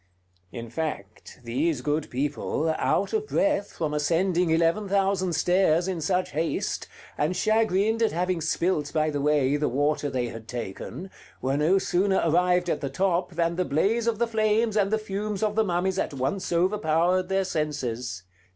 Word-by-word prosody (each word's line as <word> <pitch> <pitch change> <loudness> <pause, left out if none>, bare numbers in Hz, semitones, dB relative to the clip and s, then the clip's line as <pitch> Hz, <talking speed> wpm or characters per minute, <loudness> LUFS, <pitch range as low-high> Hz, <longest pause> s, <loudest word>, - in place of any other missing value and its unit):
In 115 -2 -7
fact, 115 -9 -5
these 135 +4 -1
good 150 +3 -1
people, 145 +4 -1
out - - +1
of 430 -1 -1
breath 295 - 0
from 155 -2 -2
ascending 170 +4 +1
eleven 165 +5 +2
thousand 195 -2 +1
stairs 175 +1 +2
in 180 -4 -2
such 180 +3 0
haste, 160 +3 -2 0.3
and 155 +5 +1
chagrined 220 +1 +2
at 225 - +3
having 180 0 -1
spilt, 155 -1 0
by 155 -1 +1
the 145 -1 -2
way, 145 -1 +2
the 150 - 0
water 145 +3 0
they 125 -3 -2
had 115 -1 -9
taken, 125 - -6 0.3
were 135 +2 -1
no 155 +6 +3
sooner 190 +1 +1
arrived 180 +2 +2
at - - -1
the 140 - -2
top 180 +4 0
than 170 0 0
the 185 - +2
blaze 215 +11 +1
of 230 -2 +1
the 235 - +2
flames 220 0 +1
and 200 -2 +2
the 220 - +2
fumes 210 0 -4
of 210 -1 +1
the 220 +1 +2
mummies 190 0 0
at 145 - -2
once 135 +10 -2
overpowered 180 0 +1
their 195 0 +1
senses. 130 - -3
170 Hz, 170 wpm, -26 LUFS, 150-195 Hz, 0.3 s, at